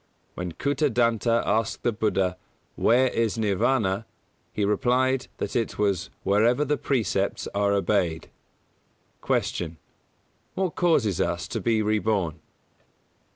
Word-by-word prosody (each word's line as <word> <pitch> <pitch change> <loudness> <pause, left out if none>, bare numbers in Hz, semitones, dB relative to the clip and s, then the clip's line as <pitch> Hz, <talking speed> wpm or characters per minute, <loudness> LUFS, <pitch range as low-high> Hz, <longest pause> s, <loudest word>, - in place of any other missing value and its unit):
When 90 -1 -5
Kūtadanta 120 - +1
asked 110 +2 0
the 120 - +2
Buddha 95 -4 0 0.4
"Where 130 +2 +3
is 115 -2 0
Nirvāna," 105 0 +1 0.5
he 105 - -1
replied 125 +5 +1
that - - -4
it 115 -2 -1
was 100 -4 0
"wherever 115 +8 +3
the 150 +1 +1
precepts 110 -9 -1
are 100 0 +2
obeyed". 95 -5 0 0.9
133. - - 0
Q. 80 -2 -5 0.8
_What 185 -4 0
causes 130 - +2
us - - -1
to - - -3
be 110 -2 +1
reborn? 105 -6 0
110 Hz, 115 wpm, -25 LUFS, 100-125 Hz, 0.9 s, Where